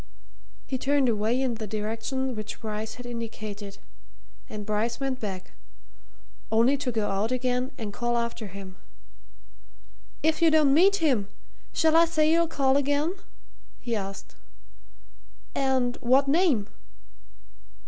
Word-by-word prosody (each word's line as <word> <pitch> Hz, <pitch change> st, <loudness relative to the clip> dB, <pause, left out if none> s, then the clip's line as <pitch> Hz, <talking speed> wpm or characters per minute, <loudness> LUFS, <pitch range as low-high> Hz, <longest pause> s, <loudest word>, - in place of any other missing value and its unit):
He 260 Hz, -, -3 dB
turned 280 Hz, 0 st, +2 dB
away 220 Hz, +3 st, +1 dB
in 260 Hz, -2 st, 0 dB
the 220 Hz, -1 st, -5 dB
direction 225 Hz, +5 st, -2 dB
which 215 Hz, 0 st, -6 dB
Bryce 215 Hz, 0 st, -4 dB
had 245 Hz, -, -10 dB
indicated, 215 Hz, -4 st, -6 dB, 0.7 s
and 210 Hz, -1 st, -6 dB
Bryce 220 Hz, +3 st, -1 dB
went 270 Hz, -2 st, -2 dB
back 190 Hz, -3 st, -5 dB, 1.0 s
only 230 Hz, +5 st, +4 dB
to 265 Hz, -2 st, -2 dB
go 220 Hz, -3 st, -1 dB
out 205 Hz, +4 st, 0 dB
again 250 Hz, 0 st, 0 dB
and 215 Hz, -5 st, -5 dB
call 240 Hz, +1 st, 0 dB
after 235 Hz, -2 st, -3 dB
him. 190 Hz, -1 st, -10 dB, 1.5 s
"If 315 Hz, +1 st, +2 dB
you 330 Hz, -, +6 dB
don't 305 Hz, -3 st, +5 dB
meet 380 Hz, +6 st, +6 dB
him, 235 Hz, -9 st, +2 dB, 0.4 s
shall 320 Hz, 0 st, +3 dB
I 335 Hz, +1 st, +7 dB
say 310 Hz, -2 st, +2 dB
you'll 335 Hz, 0 st, +4 dB
call 275 Hz, -3 st, +2 dB
again?" 290 Hz, +4 st, +1 dB, 0.7 s
he 235 Hz, -2 st, -2 dB
asked. 195 Hz, -2 st, -6 dB, 1.2 s
"And 260 Hz, -2 st, +1 dB
what 265 Hz, +3 st, +3 dB
name?" 285 Hz, -, +3 dB
245 Hz, 130 wpm, -27 LUFS, 215-275 Hz, 1.5 s, I